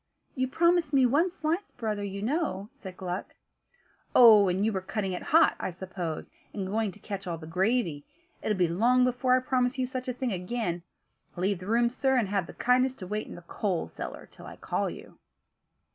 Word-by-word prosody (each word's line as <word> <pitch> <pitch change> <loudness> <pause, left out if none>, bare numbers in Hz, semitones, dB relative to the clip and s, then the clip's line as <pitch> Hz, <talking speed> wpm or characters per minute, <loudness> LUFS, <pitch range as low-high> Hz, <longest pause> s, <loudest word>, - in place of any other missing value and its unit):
"You 260 -1 0
promised 340 +2 +2
me 265 -2 +5
one 295 +9 +3
slice, 340 +3 -2
brother, 215 -3 -3
you 200 0 -5
know," 225 - -1
said 185 -2 -11
Gluck. 185 0 -5 0.8
"Oh! 215 -5 +8
and 185 +3 +1
you 220 - +1
were 190 - -1
cutting 195 +1 -3
it 180 - -4
hot, 325 +2 +4
I - - -2
suppose, 180 -3 -5 0.2
and 195 -2 -2
going 210 +2 -1
to 210 - -17
catch 195 -2 -6
all 170 -1 -2
the 160 - -10
gravy. 180 - 0 0.3
It'll 210 - 0
be 180 -2 +3
long 235 +9 +3
before 250 0 +2
I - - +4
promise 250 0 0
you 260 - +1
such 255 0 -5
a 255 - -1
thing 250 0 -2
again. 180 -1 -2 0.5
Leave 185 +1 0
the 185 - -9
room, 235 +2 +3
sir; 265 +1 +1
and 220 -6 +1
have 195 -4 0
the - - -10
kindness 255 +1 +2
to 185 - -8
wait 210 +3 -3
in - - -9
the 175 - -11
coal 180 - -2
cellar 80 - -8
till - - -13
I - - -9
call - - -2
you." - - -11
215 Hz, 205 wpm, -28 LUFS, 185-255 Hz, 0.8 s, Oh